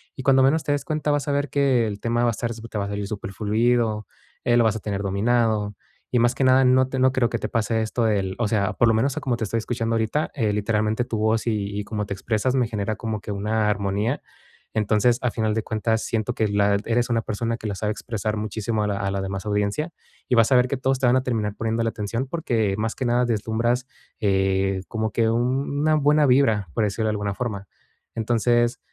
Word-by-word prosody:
Y 130 - -7
cuando 135 -1 +5
menos 155 +4 +3
te - - 0
des 145 -1 -2
cuenta, 150 -1 -1
vas 145 0 0
a - - +2
ver 145 -1 0
que 130 -5 +2
el 100 -1 -5
tema 120 +1 0
va - - +3
a - - +2
estar 115 +2 -3
te 115 -1 -7
va - - -1
a - - -5
salir 100 0 -3
superfluido, 105 +2 0 0.4
eh, 120 0 +4
lo 120 - +5
vas 110 -1 +2
a - - -7
tener 100 -1 -3
dominado, 105 +1 +1 0.4
y 125 - +2
más 120 +1 +3
que 135 - 0
nada 130 0 +5
no 130 +1 +4
te 130 0 -2
no 130 0 +4
creo 125 -3 +2
que 120 - -2
te - - -3
pase 110 0 0
esto 110 +2 -1
del 95 -3 0
o 120 - +1
sea, 100 -3 +1
por 120 - +3
lo 115 - +4
menos 130 +5 +1
a - - -2
como 125 -4 -1
te 110 - -2
estoy 115 +3 -1
escuchando 115 0 -2
ahorita, 115 +7 0
eh, 110 -7 +1
literalmente 110 +2 0
tu 115 - -3
voz 110 +2 +1
y 105 -2 -1
y - - -3
cómo 105 -1 -3
te 100 - -3
expresas 110 +6 -1
me 125 -3 +2
genera 110 -1 -2
como 110 -3 -4
que 105 - -6
una 105 +2 0
armonía. 100 +5 -1 0.5
Entonces, 110 +2 +2
a 125 - +1
final 110 -1 -1
de 110 - -1
cuentas, 110 +1 -1
siento 115 +1 -1
que 110 - +1
la 100 0 +2
eres 120 +1 +1
una 115 -1 +1
persona 115 +2 -2
que 115 - -12
la 105 - -2
sabe 105 +2 -1
expresar 110 0 -3
muchísimo 110 +1 -2
a 105 - 0
la 100 - -1
a 100 - -1
la 100 0 -2
demás 95 0 -4
audiencia, 105 - 0 0.4
y 125 - +3
vas 115 +2 +4
a 130 - +6
ver 125 0 +4
que 140 - -2
todos 130 0 0
te 130 - +2
van 120 - +4
a 130 - 0
terminar 110 -5 -1
poniéndole 115 0 -1
atención 115 +5 -3
porque, 115 -10 0
más 110 +1 -1
que 130 - -3
nada, 120 +1 +2
deslumbras, 120 +3 0 0.3
eh, 95 -1 +1
como 110 -1 -2
que 115 +2 +2
una 135 +6 +1
buena 150 0 +4
vibra, 115 -7 +3
por 115 - +1
decirlo 110 +2 -1
de - - +1
alguna 105 -1 -2
forma. 100 -5 -4 0.5
Entonces, 120 +1 +1
115 Hz, 240 wpm, -23 LUFS, 105-125 Hz, 0.5 s, a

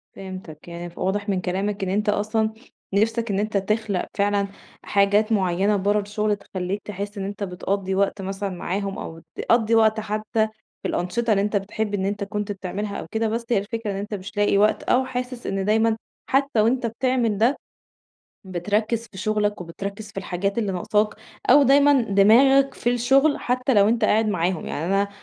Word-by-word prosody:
فهمتك 185 -5 -9
يعني 170 0 -6
ف 170 - -21
واضح 205 +2 -1
من 185 -2 0
كلامك 195 +3 -2
إن 190 - -1
أنت 210 +3 0
أصلًا 215 +1 0 0.4
نِفسك 225 +2 +1
إن 195 - 0
أنت 210 0 0
تخلق 205 -1 -1
فعلًا 200 0 +2 0.4
حاجات 205 +2 +2
معينة 195 0 +2
برّا 205 +2 +2
الشغل، 210 +1 -1
تخلّيك 195 0 -4
تحس 205 +1 -6
إن 195 - -3
أنت 200 +1 -5
بتقضّي 190 +1 -2
وقت 200 +1 0
مثلًا 195 +1 -3
معاهم 195 +2 -3
أو 165 0 -7 0.2
بتقضّي 230 -1 +2
وقت 220 -1 +4
حتى 215 +1 -1 0.4
في - - -1
الأنشطة 215 +6 -1
اللي 200 -1 +3
أنت 205 +1 -1
بتحب 205 +1 -3
إن 190 -1 0
أنت 200 0 -2
كنت 210 0 -3
بتعملها 200 +1 -4
أو - - -6
كده، 225 0 0
بس 230 +2 -2
هي 235 - +3
الفكرة 210 +1 -3
إن - - -4
أنت 205 +2 -5
مش 200 +1 -7
لاقي 205 -1 +3
وقت 210 +2 +3
أو 260 +1 +2
حاسس 250 -1 -5
إن 195 0 -1
دايمًا 220 +1 +2 0.3
حتى 270 -4 +2
وأنت 240 +2 +2
بتعمل 230 -2 0
ده، 240 +6 +3 0.9
بتركّز 210 +5 -1
في 190 - -10
شغلك 210 -1 0
وبتركّز 200 +5 -6
في - - -27
الحاجات 195 +3 -2
اللي 205 -4 0
نقصاك 210 +4 0 0.4
أو 290 - +8
دايمًا 280 +1 +5
دماغك 235 +7 +5
في 240 - 0
الشغل، 270 +5 +3
حتى 250 +1 0
لو 205 0 +5
أنت 225 -1 +2
قاعد 215 +1 +3
معاهم، 180 -3 -1
يعني 150 - -3
أنا 195 +1 +1
205 Hz, 185 wpm, -23 LUFS, 195-225 Hz, 0.9 s, أو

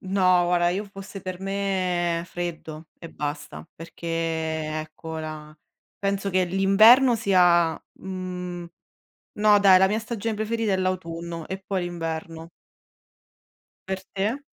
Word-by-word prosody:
No 185 -2 +3
guarda, 175 0 +2
io 190 +4 -1
fosse 195 -1 -10
per 185 -1 -6
me 185 -3 -1
freddo 165 -3 -6
e 165 - -10
basta, 145 - -6
perché 165 +1 -10
ecco 160 -1 -3
la 155 -1 -7 0.4
penso 200 0 -1
che 185 0 +2
l'inverno 215 +8 +6
sia 175 -5 +4 0.2
mhmm, 180 -2 -6 0.7
no 210 0 +5
dai, 195 -2 +7
la 190 - +5
mia 210 +3 0
stagione 225 -1 -3
preferita 220 0 -1
è - - +2
l'autunno 170 -3 -3
e 190 0 -6
poi 190 -1 -2
l'inverno. 165 -1 -5 1.4
Per 190 0 -2
te? 205 +7 -1
180 Hz, 125 wpm, -25 LUFS, 165-195 Hz, 1.4 s, dai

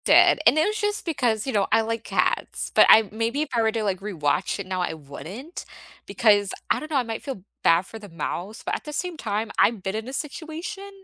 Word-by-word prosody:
Did - - +6
and - - +6
it 310 - +4
was 425 +1 -1
just 415 0 -1
because, 245 - 0
you 265 - -3
know, 200 -2 +2
I 225 - +5
like 230 0 -3
cats, - - -1
but - - +7
I 220 -1 +8
maybe 230 +7 -1
if 310 - -7
I 230 - +3
were 220 0 +2
to, 225 -1 -2
like, 195 -3 -1
rewatch 165 -8 -1
it 200 - -5
now 185 -1 -2
I 175 - -2
wouldn't. 180 - -9 0.4
Because 205 -3 +3 0.2
I - - +3
don't 305 - -8
know, 300 - +1
I 260 - +2
might 225 -1 -5
feel 265 -10 -6 0.2
bad 165 +3 +4
for 225 - -10
the 205 -2 -11
mouse, 175 +5 -5
but - - -2
at - - -6
the 300 - -6
same 360 +3 -3
time, 215 -5 -3
I've 220 -4 +3
been 190 +2 -2
in 220 +2 -4
a 260 - -7
situation 330 +8 -6
225 Hz, 245 wpm, -24 LUFS, 200-295 Hz, 0.4 s, I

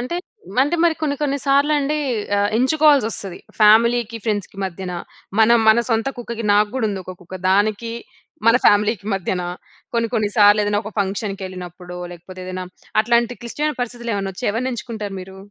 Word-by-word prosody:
అంటే 250 +8 -4 0.5
అంటే 295 +5 0
మరి 335 - +4
కొన్ని 285 -2 0
కొన్ని 285 -1 0
సార్లు 280 +2 +4
అండి 295 +2 0 0.4
ఆహ్, 205 0 +2
ఎంచుకోవాల్సి 290 -1 +4
వస్తది. 195 -5 -5 0.2
ఫ్యామిలీకి, 230 +2 +5
ఫ్రెండ్స్‌కి 205 -3 -2
మధ్యన 185 0 -5 0.5
మన 220 - +5 0.2
మన 220 +2 +6
సొంత 225 +3 +1
కుక్కకి 235 -1 -5
నాకు 210 +1 +4
గూడా 255 -4 0
ఉంది. 200 -2 -3
ఒక 185 - -7
కుక్క 180 +1 -9
దానికి 210 +3 +1 0.6
మన 230 - +7
ఫ్యామిలీకి 210 0 +3
మధ్యన. 185 -1 -2 0.5
కొన్ని 230 -1 +1
కొన్ని 215 -2 +1
సార్లు 210 0 +6
ఏదైనా 205 0 +1
ఒక 215 - -7
ఫంక్షన్‌కేల్లినప్పుడో 185 -3 -5
లేకపోతే 185 +2 -11
ఏదైనా 185 0 -4 0.4
అట్లాంటి 235 +1 +1
క్లిష్టమైన 295 +5 -2
పరిస్థితులు 235 -1 -4
ఏమైనా 195 -1 -2
వచ్చి - - -4
ఎవరిని 250 +4 -1
ఎంచుకుంటారు 220 -4 -6
మీరు? 190 +1 -11
215 Hz, 165 wpm, -20 LUFS, 195-240 Hz, 0.6 s, మన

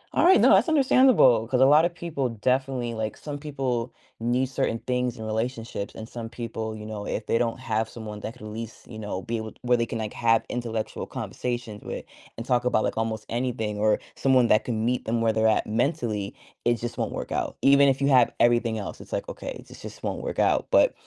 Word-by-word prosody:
alright, 370 +3 +6
no, - - +6
that's - - +4
understandable, 255 - +5
'cause 125 0 +1
a - - +8
lot 150 +4 +6
of 175 - -1
people 150 -7 -2
definitely 125 +1 -1
like, 110 -1 -3
some 145 -1 -6
people 130 -5 -2 0.3
need 120 +3 +1
certain 120 -3 -1
things 125 -1 -1
in 110 - -6
relationships, 110 -1 -3
and 110 - -7
some 115 -2 -7
people, 115 -2 -5
you 105 0 -8
know, 105 -1 -5
if 105 - -3
they 115 - +1
don't 120 +1 -1
have 110 -3 -1
someone 105 -2 -8
that 110 - -6
could 125 - -15
at - - -6
least, 115 +1 -8
you 110 -2 -9
know, 105 -3 -4
be 115 0 -2
able 110 -1 -5
to - - -22
where 125 0 +3
they 115 -1 0
can, 115 - -4
like, 110 -1 -4
have 115 -1 +2
intellectual 115 -3 -3
conversations 120 -4 -4
with, - - -6 0.3
and 115 - -5
talk 125 -1 +2
about, 125 -3 +2
like, - - -1
almost 110 -1 -2
anything, 115 -4 -2
or 105 0 +3 0.2
someone 130 -3 +3
that 110 - +4
can 110 -2 -1
meet 125 +1 0
them 115 +1 0
where 110 -1 +2
they're 110 0 +3
at 110 - +2
mentally, 110 -4 -1 0.3
it 120 0 +3
just 120 +1 -5
won't - - -1
work - - -5
out. - - -2
Even 140 0 +6
if 135 - +1
you 140 - +2
have 125 -3 +5
everything 120 -2 +3
else, 100 - -6
it's - - -14
like, - - -2
"Okay, - - -7
this - - -13
just - - -10
won't - - -3
work - - -4
out." - - +2
But, - - +5
115 Hz, 230 wpm, -26 LUFS, 110-125 Hz, 0.3 s, a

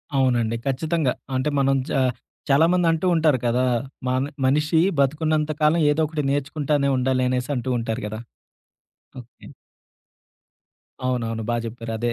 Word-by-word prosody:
అవునండి. 120 -4 +2
ఖచ్చితంగా. 155 +1 0 0.2
అంటే 130 +3 0
మనం 135 0 +3 0.2
చా 135 - +2 0.5
చాలామంది 165 +5 +4
అంటూ 165 +2 -1
ఉంటారు 155 -5 +3
కదా! 120 +2 +2 0.4
మన 130 +1 +1 0.2
మనిషి 150 +4 +2 0.2
బతుకున్నంత 155 +2 +1
కాలం 155 +3 +4
ఏదో 150 +2 0
ఒకటి 150 -1 -3
నేర్చుకుంటానే 145 0 0
ఉండాలి 130 0 +1
అనేసి 125 +2 -1
అంటూ 125 0 -3
ఉంటారు 115 +1 -3
కదా! 110 +1 -6 1.0
ఓకే. 120 0 -15 1.6
అవునవును 115 -3 -2
బా 120 - +1
చెప్పారు. 115 0 -6
అదే. 120 +1 -1
135 Hz, 130 wpm, -23 LUFS, 125-150 Hz, 1.6 s, చాలామంది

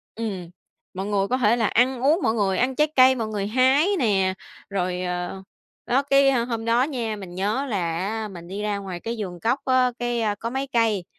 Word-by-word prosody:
Ừm, 195 -7 -5 0.4
mọi 190 +2 -4
người 200 -1 0
có 255 - 0
thể 235 -1 +3
là 225 - +1
ăn 250 +3 +2
uống, 305 +6 +3
mọi 220 - +2
người, 195 -4 +1
ăn 255 +1 0
trái 300 - +4
cây, 260 0 +7
mọi 230 -4 -3
người 205 -2 -3
hái 260 - +3
nè, 195 - +2 0.4
rồi, 180 -2 -2
ờ, 180 +1 -4 0.4
đó, 255 +3 +2
cái 275 -1 +4
hôm 235 -2 -1
đó 230 +2 +3
nha, 240 -6 -2
mình 190 -4 -9
nhớ 210 +9 -1
là 175 -7 -1
á 215 +4 -3
mình 175 -3 -10
đi 195 +3 -5
ra 210 -1 -1
ngoài 190 -3 -6
cái 230 +5 -4
vườn 180 -4 -5
cóc 240 +8 +1
á, 255 -1 +3
cái, 240 -1 -1 0.2
có 230 - -3
mấy 265 +2 -2
cây 225 -5 +2
225 Hz, 215 wpm, -24 LUFS, 195-255 Hz, 0.4 s, cây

